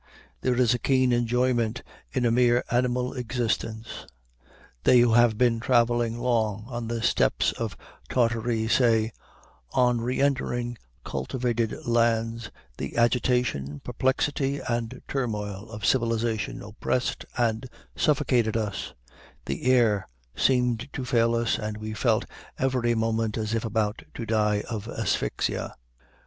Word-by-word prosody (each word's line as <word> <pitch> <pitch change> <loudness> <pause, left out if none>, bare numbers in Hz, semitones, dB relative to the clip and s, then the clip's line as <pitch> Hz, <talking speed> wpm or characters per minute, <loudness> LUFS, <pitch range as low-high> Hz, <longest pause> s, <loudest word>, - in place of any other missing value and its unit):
There 125 -1 +1
is 125 -1 +3
a 120 - -1
keen 130 -1 +2
enjoyment 120 -1 +1 0.3
in 125 - 0
a 115 - +3
mere 120 0 +3
animal 125 +1 +1
existence." 115 -3 -3 0.8
They 125 - +6
who 120 -1 +4
have 120 -2 +5
been 120 -1 +3
traveling 120 -1 +2
long 110 -4 0
on 120 -2 -5
the 115 0 -3
steppes - - +2
of - - -5 0.3
Tartary 115 -2 +1
say, 115 -2 +3 0.6
"On 125 -2 +3
reëntering 120 -1 0 0.3
cultivated 120 - -2
lands, 115 -1 +1 0.3
the - - -5
agitation, 120 - +1
perplexity, 135 +2 0
and 115 -1 -3
turmoil 105 -5 -3
of 105 -1 -6
civilization 115 -3 0
oppressed 110 +4 -2
and 115 0 0 0.3
suffocated 125 -7 +2
us; 105 - -4 0.5
the 70 - -4
air 110 -6 +3 0.3
seemed 125 -1 +1
to 130 - -4
fail 115 -1 +2
us, 115 -1 +1
and 105 -1 -4
we 110 0 -5
felt 110 0 +1 0.3
every 125 -3 +1
moment 110 -1 0
as 110 0 -2
if 115 - 0
about 110 -1 -1
to 115 - -4
die 105 -1 +1
of 110 -2 -5
asphyxia." 110 - -2
115 Hz, 125 wpm, -26 LUFS, 110-125 Hz, 0.8 s, They